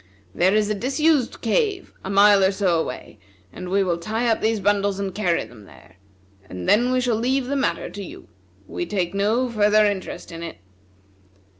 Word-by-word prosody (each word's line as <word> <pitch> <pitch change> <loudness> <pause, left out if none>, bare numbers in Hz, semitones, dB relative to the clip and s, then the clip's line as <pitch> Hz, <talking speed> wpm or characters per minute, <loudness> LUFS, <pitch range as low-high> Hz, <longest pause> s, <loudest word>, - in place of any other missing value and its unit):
There 185 +3 +2
is 215 -1 +2
a 210 - 0
disused 275 +4 0
cave, 395 - -1
a 190 - -6
mile 200 0 +5
or 190 - +4
so 190 -4 +1
away, 125 -7 -6 0.3
and 180 - -7
we 195 +1 +2
will 175 -2 -1
tie 220 +7 -2
up 225 - +1
these 220 0 +1
bundles 200 0 +1
and 195 -2 -3
carry 180 -5 0
them 110 -4 -15
there; 95 -1 -18 0.5
and 90 -1 -7
then 240 +4 +3
we 255 - +2
shall 245 -2 +1
leave 255 +4 0
the 280 +3 -2
matter 270 - -1
to 200 - -8
you. 360 - -11 0.4
We 350 - -5
take 185 -4 -2
no 215 +6 +1
further 215 -2 +3
interest 200 -4 -4
in 165 0 -8
it. 170 -1 -7
205 Hz, 190 wpm, -22 LUFS, 190-240 Hz, 0.5 s, mile